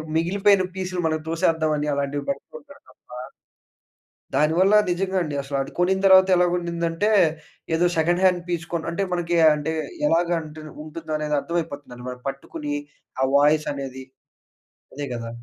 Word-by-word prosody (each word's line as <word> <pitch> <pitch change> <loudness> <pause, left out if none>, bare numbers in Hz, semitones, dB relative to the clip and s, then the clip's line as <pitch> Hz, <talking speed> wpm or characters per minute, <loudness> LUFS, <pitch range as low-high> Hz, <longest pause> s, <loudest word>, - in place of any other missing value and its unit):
మిగిలిపోయిన 195 +4 +3
పీసులు 185 -1 -3
మన‌కి 155 -1 -1
తోసేద్దాం 160 -1 +1
అని 150 0 -2
అలాంటివి 140 0 -2
పెడుతూ 280 - -5
ఉంటాడు 285 0 -17
తప్పా 125 - -14 1.2
దానివల్ల 175 +7 +4 0.2
నిజంగా 190 +2 -1
అండి. 150 -3 -4
అసలు 140 0 -3
అది 135 - -6
కొనిన 190 +2 +2
తర్వాత 190 0 +7
ఎలాగఉండిదంటే, 175 +2 0 0.6
ఏదో 175 +2 +3
సెకండ్ 175 +3 +2
హాండ్ 180 -2 +3
పీస్ 175 -1 -2
కొని 165 -1 -2
అంటే 195 +4 -1
మనకి 175 -1 0 0.2
అంటే 150 +2 -3 0.4
ఎలాగా 170 +1 +2
అంటే 155 0 -10 0.2
ఉంటుందో 160 0 -7
అనేది 150 -1 0
అర్థమైపోతుందండి. 145 -7 -5
వాడు 125 0 -9
పట్టుకుని, 145 +2 -5 0.5
ఆ - - +5
వాయిస్ 150 +2 +3
అనేది 130 -1 -7 0.9
అదే 145 +1 -4
గదా! 115 -1 -5
165 Hz, 145 wpm, -23 LUFS, 150-180 Hz, 1.2 s, తర్వాత